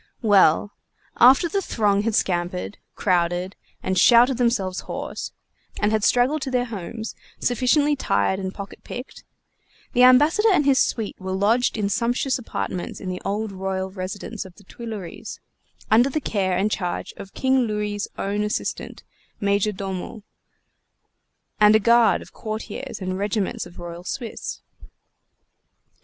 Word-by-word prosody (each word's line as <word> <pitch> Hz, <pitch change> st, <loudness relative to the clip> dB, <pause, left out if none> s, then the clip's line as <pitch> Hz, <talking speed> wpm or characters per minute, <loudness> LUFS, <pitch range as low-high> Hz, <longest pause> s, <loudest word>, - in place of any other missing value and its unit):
Well, 205 Hz, -2 st, +4 dB, 0.5 s
after 265 Hz, +7 st, +6 dB
the 390 Hz, +4 st, -1 dB
throng 205 Hz, -, +1 dB
had 220 Hz, 0 st, 0 dB
scampered, 180 Hz, +1 st, -1 dB, 0.2 s
crowded, 180 Hz, 0 st, 0 dB, 0.3 s
and 190 Hz, -1 st, +1 dB
shouted 240 Hz, +3 st, +6 dB
themselves 210 Hz, -7 st, +1 dB
hoarse, -, -, -6 dB, 0.5 s
and 210 Hz, 0 st, +2 dB
had 215 Hz, -1 st, +1 dB
straggled 255 Hz, +7 st, +3 dB
to 265 Hz, -, -3 dB
their 250 Hz, -1 st, +1 dB
homes, 220 Hz, 0 st, -6 dB, 0.3 s
sufficiently 275 Hz, +4 st, +2 dB
tired 190 Hz, -, 0 dB
and 190 Hz, -1 st, -3 dB
pocket 200 Hz, 0 st, -9 dB
picked, 250 Hz, +2 st, -8 dB, 0.7 s
the 245 Hz, -, +3 dB
Ambassador 295 Hz, -, +6 dB
and 325 Hz, -7 st, +3 dB
his 275 Hz, -2 st, +4 dB
suite 220 Hz, -3 st, -1 dB
were 185 Hz, 0 st, -3 dB
lodged 220 Hz, +6 st, +2 dB
in 205 Hz, -2 st, 0 dB
sumptuous 245 Hz, +5 st, 0 dB
apartments 185 Hz, -6 st, -4 dB
in 185 Hz, -, -5 dB
the 180 Hz, 0 st, -4 dB
old 210 Hz, +2 st, -2 dB
royal 190 Hz, 0 st, -3 dB
residence 195 Hz, +3 st, -5 dB
of 185 Hz, -2 st, -14 dB
the 205 Hz, -, -18 dB
Tuileries, 210 Hz, -4 st, -8 dB, 0.5 s
under 240 Hz, +5 st, +5 dB
the 310 Hz, -, -1 dB
care 190 Hz, -9 st, -1 dB
and 205 Hz, +3 st, +1 dB
charge 180 Hz, -4 st, -3 dB
of 195 Hz, -, -10 dB
King 260 Hz, -2 st, +2 dB
Louis' 210 Hz, -1 st, -2 dB
own 205 Hz, +1 st, -1 dB
assistant 210 Hz, 0 st, -3 dB, 0.4 s
Major 200 Hz, +1 st, +1 dB
Domo 195 Hz, +1 st, -6 dB, 1.4 s
and 210 Hz, 0 st, +7 dB
a -, -, +6 dB
guard 235 Hz, +2 st, +4 dB
of -, -, -18 dB
courtiers 215 Hz, -1 st, -6 dB
and 185 Hz, 0 st, -3 dB
regiments 205 Hz, 0 st, -2 dB
of 175 Hz, -, -16 dB
Royal 175 Hz, 0 st, -8 dB
Swiss. 230 Hz, +4 st, -6 dB
210 Hz, 145 wpm, -23 LUFS, 190-240 Hz, 1.4 s, and